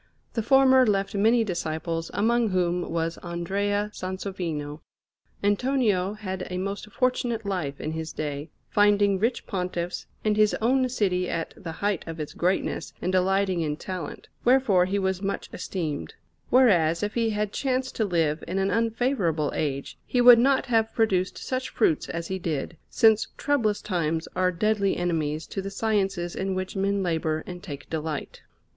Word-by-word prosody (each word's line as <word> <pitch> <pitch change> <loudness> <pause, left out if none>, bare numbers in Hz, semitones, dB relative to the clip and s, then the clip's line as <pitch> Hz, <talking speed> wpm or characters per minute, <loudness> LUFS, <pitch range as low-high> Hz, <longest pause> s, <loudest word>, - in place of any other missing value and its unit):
The 230 - 0
former 265 +2 +6
left 195 -2 +1
many 225 +4 +4
disciples, 165 -3 -3
among 230 +1 +2
whom 180 -1 0
was 165 0 -2
Andrea 200 +4 -1
Sansovino. 180 -6 -4 0.6
Antonio 205 -3 +1
had 190 -3 -5
a 180 - -3
most 200 +3 -4
fortunate 240 -2 0
life 170 -8 -2
in 155 - -3
his 160 0 -4
day, 145 0 -4 0.2
finding 205 -1 +3
rich 230 +5 0
Pontiffs, 180 -3 -3 0.2
and 210 -1 +2
his 215 -1 +4
own 255 +3 +2
city 185 -6 0
at 165 - -3
the 185 -8 -7
height 200 +1 -1
of 165 0 -6
its 150 - -5
greatness 180 +2 -1
and 180 - -1
delighting 185 -1 +2
in 150 -2 -1
talent, 180 -4 -6 0.2
wherefore 240 -8 +4
he 195 +2 -1
was 190 -1 -1
much 200 0 -3
esteemed; 155 - -4 0.3
whereas, 175 -10 +4
if 210 - -1
he 230 -1 +1
had 210 -1 -2
chanced 260 -1 -1
to 225 - +2
live 165 -5 0
in 185 - -2
an 195 0 +1
unfavourable 225 - +1
age, 140 -2 -3
he 250 - 0
would 245 -1 +9
not 270 +2 +3
have 225 -3 +2
produced 190 -5 +1
such 255 0 -3
fruits 160 -9 +1
as 170 0 -3
he 190 0 -3
did, 160 -1 -3
since 220 -1 +4
troublous 235 -8 +1
times 165 -3 -1
are 185 0 +2
deadly 200 +2 +1
enemies 160 -3 -1
to 195 - -4
the 195 - -5
sciences 195 -4 -1
in 190 0 -2
which 185 +1 -4
men 195 0 0
labour 160 -2 -1
and 180 -1 -8
take 145 -8 -8
delight. 155 -2 -4
190 Hz, 165 wpm, -26 LUFS, 170-215 Hz, 0.6 s, would